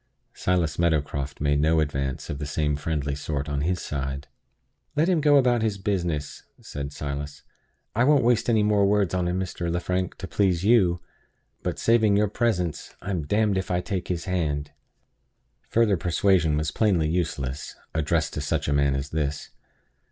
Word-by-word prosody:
Silas 90 -4 0
Meadowcroft 75 -4 0
made 70 0 +2
no 80 +2 +3
advance 70 -3 -2
of 70 - -5
the 75 - -4
same 75 0 0
friendly 75 -1 -2
sort 70 0 -3
on 70 -1 -2
his 90 +3 0
side. 70 -1 -4 0.7
"Let 155 +3 +3
him 180 -4 +2
go 145 -1 +5
about 125 -3 +3
his 110 -3 0
business," 85 -7 -2 0.2
said 70 0 -6
Silas. 70 0 -5 0.5
"I 120 - +3
won't 145 -2 +4
waste 120 -1 +2
any 110 -3 +3
more 105 -1 +3
words 100 -3 +2
on 90 -1 0
him, 90 +1 -1
Mr. 85 -2 -3
Lefrank, 90 +1 -1
to - - -6
please 95 -4 +1
you. 95 -6 +4 0.6
But - - -3
(saving 110 -3 +3
your 105 -1 +2
presence) 95 -8 -1
I'm 90 -7 -3
d 110 +7 +2
d 95 - +1
if 95 - -5
I 90 -1 +1
take 95 -1 -3
his 85 -2 -3
hand!" 75 -6 -1 1.0
Further 110 -4 +3
persuasion 85 -2 +2
was 75 -1 -1
plainly 95 -8 +2
useless, 75 -5 -2 0.2
addressed 80 0 0
to 75 - -3
such 75 -1 -1
a 70 - +1
man 70 -1 +2
as 70 +1 -3
this. 75 -2 -2
85 Hz, 175 wpm, -25 LUFS, 75-100 Hz, 1.0 s, go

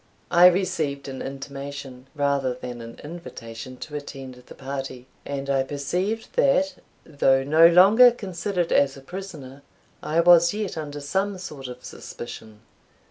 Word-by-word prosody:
I 175 +1 +8
received 170 -7 0
an 135 -1 -6
intimation, 135 -1 -7
rather 140 -3 0
than 125 -1 -7
an 115 0 -10
invitation, 130 -7 -9
to 150 - -8
attend 135 -3 -7
the 125 0 -15
party; 135 -2 -6 0.2
and 140 -1 -4
I 135 -1 +2
perceived, 180 +11 -3
that, 280 +1 +3 0.3
though 135 -3 +2
no 155 +4 +6
longer 200 +8 +7
considered 190 -5 -3
as 140 -1 +3
a - - -11
prisoner, 145 -5 -9 0.4
I 160 +2 0
was 170 +1 +6
yet 210 -3 -3
under 145 -2 -6
some 195 +7 -1
sort 150 -7 -8
of 125 0 -10
suspicion. 110 -2 -9
145 Hz, 140 wpm, -24 LUFS, 135-175 Hz, 0.4 s, I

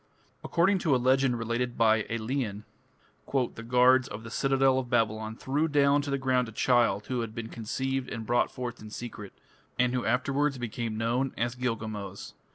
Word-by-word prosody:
According 190 +3 +2
to 155 -6 +2
a - - +4
legend 130 0 +2
related 120 +1 -2
by 110 -2 +3
Aelian, 115 -2 -2 0.7
"the 125 -4 -1
guards 125 +2 +4
of 105 +2 -8
the 115 - -9
citadel 135 0 +2
of 125 -2 -5
Babylon 110 -2 0
threw 145 +7 0
down 145 -1 +3
to 145 - -5
the 140 - 0
ground 130 -3 +1
a - - -10
child 115 -4 +2
who 125 -2 -2
had 115 -1 -6
been 115 -1 -5
conceived 130 +4 -3
and 115 -1 -5
brought 120 +2 +2
forth 120 -2 -6
in 110 - -9
secret, 105 -3 -7 0.5
and 125 0 +2
who 125 - 0
afterwards 135 +4 +1
became 115 -2 -4
known 120 +4 0
as 120 0 0
Gilgamos". 110 -6 -4
120 Hz, 175 wpm, -28 LUFS, 115-130 Hz, 0.7 s, a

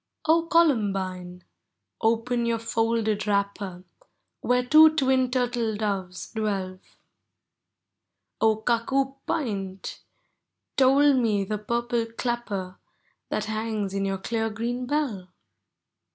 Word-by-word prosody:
() - - -52
Columbine! 205 - +1 0.6
open 235 +2 +1
your 230 0 +1
folded 225 -2 0
wrapper, 200 -2 -1 0.6
Where 250 0 +1
two 310 +3 +7
twin 260 -3 +2
turtle 245 -3 0
doves 195 -4 -3
dwell! 195 -4 -2 0.9
* - - -57
0 220 -1 +5
Cuckoo 265 +3 +1
pint! 195 - -3 0.8
toll 275 +2 +5
me 225 -6 +2
the 210 +2 -3
purple 235 +1 -1
clapper 210 -7 -3 0.5
That - - -1
hangs 215 -2 -3
in 195 0 -1
your 195 0 -1
clear 225 +3 -2
green 240 +3 -3
bell 245 -11 -2
225 Hz, 105 wpm, -26 LUFS, 200-250 Hz, 0.9 s, two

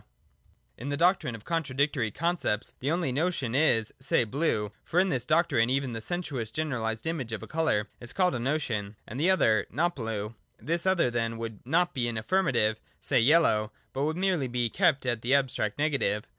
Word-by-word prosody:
221 - - -8
In 140 - -4
the 145 - -1
doctrine 170 -7 +2
of 110 - -12
contradictory 140 -6 0
concepts, 155 - -1
the 135 - -2
one 165 -5 0
notion 145 -5 -1
is, 120 -6 +2
say, 130 -2 +3
blue 110 -4 -1
(for 175 - +1
in 190 +1 +3
this 125 -4 -2
doctrine 155 -8 +3
even 135 -1 0
the 115 - -5
sensuous 145 -8 -3
generaHsed 115 -6 -2
image 155 -8 -3
of 110 -3 -4
a - - -8
colour 155 -10 0
is 120 - -8
called 180 -2 +2
a - - -2
notion) 115 -6 -2
and 120 - -6
the 170 +5 +3
other 110 - +3
not 170 +8 0
blue. 110 -3 -4 0.3
This 170 +3 0
other 180 -9 +3
then 115 -1 -1
would 115 -2 -6
not 175 +5 +2
be 120 -2 0
an 115 -1 -3
affirmative, 110 - +1 0.2
say, - - +2
yellow, 115 -6 +4 0.2
but 135 +2 0
would 155 +2 -1
merely 180 -7 +1
be 120 -2 -1
kept 135 - +2
at 120 -3 -1
the 125 +4 +3
abstract 130 -6 0
negative. 140 -8 0
130 Hz, 195 wpm, -28 LUFS, 115-160 Hz, 0.3 s, yellow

